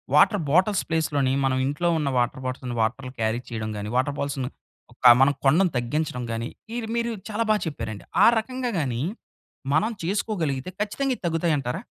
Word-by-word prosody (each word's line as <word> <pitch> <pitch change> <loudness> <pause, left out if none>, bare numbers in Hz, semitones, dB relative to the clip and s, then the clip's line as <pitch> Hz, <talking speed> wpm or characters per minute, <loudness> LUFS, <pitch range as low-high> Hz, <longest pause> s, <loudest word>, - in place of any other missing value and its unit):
Water 190 +5 +5
bottles 185 +5 +3
ప్లేస్‌లోని 145 -5 +1
మనం 130 -1 +1
ఇంట్లో 145 +5 0
ఉన్న 140 -2 0
వాటర్ 120 +2 -1
బాటిల్స్‌ని 125 -1 -4
వాటర్‌లు 125 +3 -1
క్యారీ 110 +1 0
చేయడం 110 -2 -4
గాని, 105 +1 -4
వాటర్ 140 +2 +1
బాల్స్‌ని 140 -2 -2 0.4
ఒక 125 0 +6
మనం 145 +1 +5
కొనడం 170 +8 +5
తగ్గించడం 125 +1 -2
గాని, 115 +1 -2 0.3
ఇవి 235 -2 -3
మీరు 235 0 0 0.2
చాలా 220 +2 0
బాగా 215 -1 +3
చెప్పారండి. 110 -8 -5 0.2
ఆ - - +9
రకంగా 255 +2 -3
గాని 125 -4 -1 0.7
మనం 165 +9 +2
చేసుకోగలిగితే 175 - -1
ఖచ్చితంగా 265 +6 0
ఇవి - - -36
తగ్గుతాయి 165 -1 +1
అంటారా? 135 - -4
145 Hz, 165 wpm, -25 LUFS, 125-190 Hz, 0.7 s, ఆ